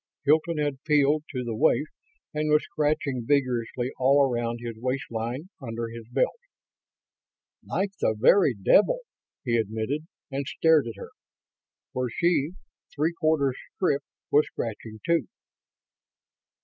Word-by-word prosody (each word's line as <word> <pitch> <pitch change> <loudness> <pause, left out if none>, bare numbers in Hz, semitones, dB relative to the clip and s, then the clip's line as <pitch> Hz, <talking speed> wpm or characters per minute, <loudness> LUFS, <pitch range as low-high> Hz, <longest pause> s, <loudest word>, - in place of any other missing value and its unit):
Hilton 155 +3 +3
had 145 -3 -1
peeled 150 0 +3
to 125 -3 -3
the 115 -2 -3
waist 120 +6 +2 0.4
and 155 0 -1
was 150 0 +4
scratching 145 -4 -1
vigorously 125 -2 0
all 140 +2 +5
around 120 -2 -1
his 120 -1 -6
waistline, 125 +3 -3
under 115 -2 -4
his 115 -1 -9
belt. 125 - 0 1.2
"Like 195 0 -1
the 110 - +1
very 135 - +5
devil," 210 - +4 0.4
he 120 -3 +1
admitted, 110 +8 -2 0.2
and 135 0 -3
stared 160 -5 +3
at 115 - -6
her. - - -9 0.8
For 130 -1 -1
she, 170 +3 +1 0.4
three 155 +4 +1
quarters 155 -5 +1 0.2
stripped, 145 -7 0 0.2
was 150 +1 +5
scratching, 110 -1 -6
too! 170 - +2
135 Hz, 125 wpm, -26 LUFS, 115-150 Hz, 1.2 s, all